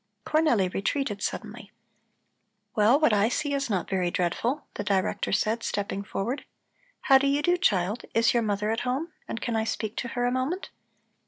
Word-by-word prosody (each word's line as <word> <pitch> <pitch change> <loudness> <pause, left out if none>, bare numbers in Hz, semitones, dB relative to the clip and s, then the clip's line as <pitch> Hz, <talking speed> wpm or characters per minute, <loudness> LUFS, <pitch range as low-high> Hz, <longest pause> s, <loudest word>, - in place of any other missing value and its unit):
Cornelli 305 -11 +3
retreated 205 0 -1
suddenly. - - -5 1.0
"Well, 225 +6 +4
what 305 -8 +4
I 210 +2 +3
see 290 +3 -1
is 280 -2 -1
not 190 -5 -1
very 185 -2 0
dreadful," 205 - -1
the - - -4
Director 195 -2 0
said, 220 +3 +1
stepping 200 -2 -2
forward. 235 +8 -3 0.6
"How 270 -1 +6
do 275 - +1
you 285 +1 +1
do, 350 +3 +4
child. 210 - +1
Is 230 0 +4
your 240 - +3
mother 210 0 0
at 225 - 0
home, 275 +7 -2
and 225 - -4
can 235 - -2
I 220 - +1
speak 220 -1 -3
to 240 - -2
her 245 - +2
a 245 - +2
moment?" 260 +9 -2
230 Hz, 180 wpm, -27 LUFS, 205-275 Hz, 1.0 s, How